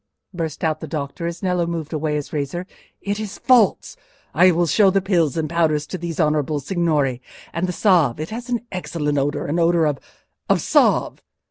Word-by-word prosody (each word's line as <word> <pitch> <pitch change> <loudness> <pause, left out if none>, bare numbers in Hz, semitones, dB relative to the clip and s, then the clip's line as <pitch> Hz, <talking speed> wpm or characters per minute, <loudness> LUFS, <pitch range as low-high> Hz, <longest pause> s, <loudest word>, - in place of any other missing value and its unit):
burst 165 -3 -4
out 155 -1 0
the - - -7
doctor, 155 +2 -4
as 170 +3 -6
Nello 180 -2 0
moved 165 -2 -4
away 155 -1 -1
his 145 -1 -4
razor; 150 +5 -3 0.4
"it 205 +1 -3
is 215 -2 -6
false! 240 -7 +3 0.4
I 180 +5 +6
will 175 0 +2
show 195 +4 +4
the 195 +1 +2
pills 170 -7 +1
and 160 -1 0
the 160 - -9
powders 155 -3 +1
to 185 - -6
these 170 -1 -5
honourable 150 -2 +1
signori—and 150 0 -2
the - - -1
salve—it 165 - +2
has 240 +3 -6
an 240 -1 -2
excellent 150 -5 -2
odour—an 145 +3 -1
odour 170 -1 +3
of—of 145 -3 -3
salve." - - +2
165 Hz, 175 wpm, -21 LUFS, 150-180 Hz, 0.4 s, I